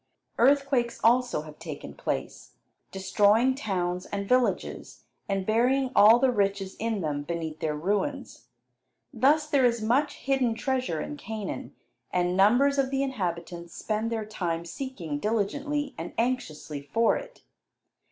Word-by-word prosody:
Earthquakes 275 -2 +3
also 240 -7 +3
have 155 -1 -12
taken 145 - -7
place, - - -4 0.4
destroying 205 +6 +3
towns 180 -8 -2
and 200 -1 -4
villages, 250 +1 0 0.3
and 195 -1 -1
burying 250 +5 +2
all 220 +3 +8
the 260 +1 +3
riches 195 -3 -1
in 225 -2 -1
them 150 -3 -2
beneath 160 0 -4
their 155 -1 -1
ruins. 210 - -2 0.7
Thus 290 +5 +3
there 285 -3 +2
is 235 -1 +3
much 255 +7 +1
hidden 265 -4 0
treasure 255 - -1
in 295 - -5
Canaan, 220 -6 -6 0.4
and 180 0 +1
numbers 245 +9 +4
of 265 -1 +2
the 270 0 0
inhabitants 175 -8 -4
spend 220 +1 -2
their 220 -2 -2
time 170 -5 -3
seeking 170 - -5
diligently 275 - -1
and 165 - -6
anxiously 190 - -2
for 225 +11 +2
it. - - -8
220 Hz, 135 wpm, -27 LUFS, 180-260 Hz, 0.7 s, all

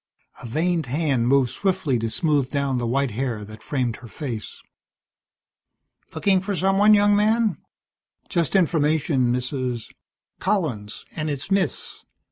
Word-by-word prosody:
A 125 - -7
veined 160 +4 0
hand 135 -3 +1
moved 135 -2 +3
swiftly 165 - 0
to 115 0 -2
smooth 145 -1 +1
down 140 -3 0
the 120 - -2
white 135 +1 +1
hair 115 -2 -3
that 110 +1 -12
framed 125 -4 -2
her 120 - -12
face. 115 -4 -6 1.5
"Looking 190 -2 +2
for 200 +1 -2
someone, 195 +3 +5
young 205 0 +4
man?" 215 -3 +2 0.7
"Just 170 +1 0
information, 155 -7 +2
Mrs. 125 -1 -3 0.2
" - - -68
"Collins, 155 - -2
and 155 -1 -2
it's 145 +5 -4
Miss. 195 -1 -1
145 Hz, 135 wpm, -23 LUFS, 125-180 Hz, 1.5 s, someone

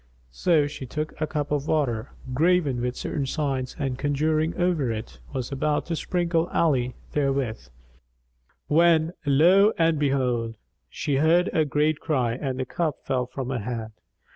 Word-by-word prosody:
So 155 - +2
she 145 -2 -6
took 150 +4 -4
a 155 - +1
cup 150 -2 -3
of 145 0 -1
water, 130 -7 0 0.2
graven 155 -3 +2
with 125 +1 -2
certain 140 -2 -3
signs 135 -3 -2
and 135 -4 -2
conjuring 155 +3 +1
over 170 -9 +1
it, 110 +1 -6
was 130 -2 -4
about 145 +2 0
to 170 - -2
sprinkle 170 0 0
Ali 130 -9 +1 0.2
therewith, 135 - -1 1.0
when 165 +1 +4
lo 180 +9 +5
and 165 -2 +2
behold! 125 -5 0 0.3
she 140 -3 -1
heard 165 +5 +3
a 160 -4 +3
great 150 +2 +1
cry 130 -8 0
and 130 +1 -3
the 130 - -1
cup 155 +2 -1
fell 125 -2 0
from 130 0 -5
her 130 - -1
hand. 110 0 -4
145 Hz, 155 wpm, -25 LUFS, 130-160 Hz, 1.0 s, lo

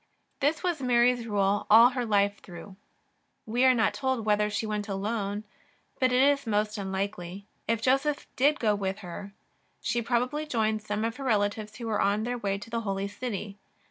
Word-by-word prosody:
This 300 +5 +1
was 350 -5 -1
Mary's 245 -1 +3
rule 205 -1 +1
all 230 +3 +8
her 250 -2 -3
life 200 -1 +2
through. 180 +2 -11 0.7
We 240 +4 +2
are 260 - +7
not 220 -2 +2
told 260 -4 -1
whether 210 0 +2
she 210 +2 -2
went 210 -1 -3
alone, 205 +1 -2 0.6
but 255 -1 +3
it 250 +1 +4
is 280 -2 +2
most 210 0 0
unlikely. 190 -1 -4 0.2
If 225 0 0
Joseph 275 +3 +1
did 285 +4 +4
not - - -15
go 215 -3 +3
with 195 -1 -2
her, 185 +3 -7 0.5
she 240 - -1
probably 250 +6 -1
joined 220 -5 0
eome 210 +1 -2
of 230 +1 -3
her 275 - -6
relatives 210 -2 0
who 235 - -7
were 215 -2 0
on 205 +2 +1
their 245 +1 -2
way 200 -2 -1
to 205 +3 -10
the 230 0 -1
Holy 195 -2 -2
City. 205 -2 -5
215 Hz, 190 wpm, -28 LUFS, 205-245 Hz, 0.7 s, all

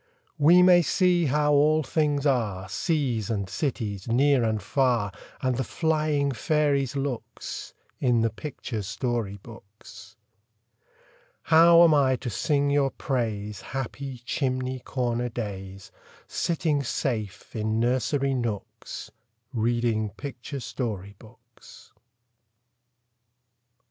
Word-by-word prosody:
We 170 +5 +7
may 180 -1 +7
see 175 0 +2
how 150 +2 +2
all 155 +2 +4
things 145 0 0
are, 105 -9 0
Seas 125 - -1
and 100 -4 -1
cities, 105 - -3
near 130 +2 +3
and 110 -1 0
far, 120 -1 +1 0.3
And 130 -2 +1
the 130 - 0
flying 155 -1 0
fairies' 140 0 +1
looks, 135 -4 -5 0.2
In 120 -3 +2
the 115 -1 +1
picture 115 -3 -5
story 110 0 -2
books. 110 -1 -14 1.3
How 170 +1 +7
am 165 -2 +6
I 135 -3 +4
to 125 -1 -5
sing 140 +6 +1
your 140 -1 +3
praise, 110 -6 -3
Happy 135 0 -5
chimney 130 -1 -1
corner 125 -1 -2
days, 100 -4 -6 0.4
Sitting 160 -3 0
safe 110 -6 -3
in 110 0 -1
nursery 130 +3 +1
nooks, 115 -6 -5 0.4
Reading 115 -2 0
picture 135 +4 -7
story 100 -7 -4
books? 115 +1 -17
125 Hz, 110 wpm, -26 LUFS, 110-145 Hz, 1.3 s, We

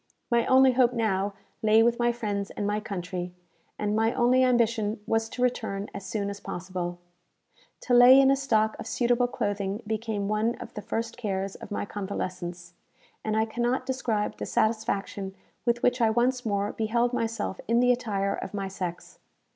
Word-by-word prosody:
My 235 -1 +3
only 260 0 +6
hope 250 -1 +3
now 205 -4 0 0.3
lay 220 0 +5
with 235 +1 +2
my 240 0 +3
friends 205 -4 -3
and 205 - -4
my 210 +1 0
country, 180 -3 -5 0.4
and 210 0 -1
my 225 +1 +2
only 255 +1 +4
ambition 230 -4 +2
was 225 0 0
to 250 - -3
return 220 -5 -1
as 200 - -6
soon 200 0 -3
as 200 - -8
possible. 180 -2 -5 0.8
To 250 - -1
lay 245 +2 +9
in 270 0 +6
a - - +5
stock 220 -6 +1
of - - -6
suitable 245 0 +2
clothing 205 -2 -2
became 215 -2 -2
one 215 +3 +1
of 230 - -10
the 210 - -6
first 225 +2 -3
cares 195 -4 -2
of - - -10
my 205 - -2
convalescence; 180 -3 -5 0.5
and 215 0 0
I 220 - +3
cannot 240 +3 -1
describe 230 -5 -1
the - - -5
satisfaction 205 -3 -1 0.3
with 235 0 +1
which 250 0 +2
I 225 - +5
once 245 +3 +1
more 200 0 0
beheld 235 +2 0
myself 230 -5 -2
in 230 +2 +3
the 250 0 +5
attire 205 -5 0
of 190 - -6
my 195 -1 -2
sex. 185 - -6
220 Hz, 180 wpm, -27 LUFS, 200-240 Hz, 0.8 s, lay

